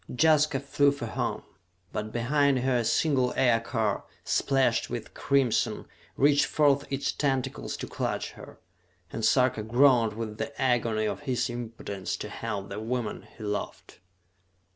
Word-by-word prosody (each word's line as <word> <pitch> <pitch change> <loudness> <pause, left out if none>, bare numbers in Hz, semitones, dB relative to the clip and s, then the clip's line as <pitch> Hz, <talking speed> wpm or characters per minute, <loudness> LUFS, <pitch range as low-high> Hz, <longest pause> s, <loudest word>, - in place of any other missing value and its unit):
Jaska 150 0 +3
flew 140 +1 +2
for 140 -4 -5
home; 110 - -3 0.5
but 105 0 -3
behind 140 +4 +2
her 130 -1 +2
a 120 - +1
single 130 0 +2
aircar, 115 -4 +1 0.2
splashed 135 -1 +1
with - - -6
crimson, 135 -5 +1 0.3
reached 145 +1 +4
forth 145 -2 +2
its 140 +1 0
tentacles 135 -2 -2
to - - -5
clutch - - -3
her - - -13 0.6
and 115 - -4
Sarka 125 -1 +3
groaned 120 0 +4
with 110 -1 -6
the 140 - -5
agony 115 -4 +1
of - - -2
his 125 -1 0
impotence 115 -5 -5
to - - -6
help 100 -1 -5
the 100 +2 -5
woman 115 -1 -3
he 110 - -9
loved. 105 -1 -5
125 Hz, 140 wpm, -28 LUFS, 110-140 Hz, 0.6 s, reached